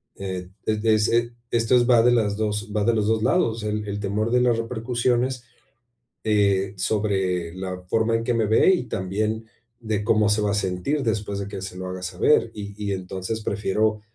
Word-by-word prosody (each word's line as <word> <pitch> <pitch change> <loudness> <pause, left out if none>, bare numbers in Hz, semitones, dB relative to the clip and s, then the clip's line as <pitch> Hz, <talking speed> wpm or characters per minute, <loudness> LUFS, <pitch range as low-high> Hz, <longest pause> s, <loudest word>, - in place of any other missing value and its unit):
Eh, 95 -2 -5 0.2
desde 110 +1 +2
ese 115 +2 +1 0.2
esto 115 +1 +3
es 120 0 +4
va 120 -2 +6
de 120 +1 +4
las 105 -4 +1
2 105 0 -2
va 105 - +1
de 115 +2 +2
los 105 -1 +1
2 110 0 +1
lados, 120 -2 +2
o - - -6
sea, 105 -1 -3
el 105 0 -3
el 100 0 -3
temor 105 +3 -1
de 125 0 +3
las 120 -2 +3
repercusiones, 120 +2 -1 0.8
eh, 100 -2 +2
sobre 95 -4 -1
la 95 -1 -5
forma 115 +2 +2
en 115 - -3
que 120 - 0
me 115 -2 +1
ve, 110 - +5
y 150 - -2
también 105 +4 -2 0.3
de 110 -3 -2
cómo 110 -1 +3
se 105 0 +2
va 105 - +1
a - - 0
sentir 105 +9 -1
después 105 -3 -1
de 100 - -4
que 95 -2 -6
se 95 -1 -7
lo 95 0 -5
haga 90 0 -6
saber, 110 +7 +2
y 100 -1 -7
y 100 - -1
entonces 95 +4 -4
prefiero 105 +1 0
105 Hz, 210 wpm, -24 LUFS, 100-115 Hz, 0.8 s, va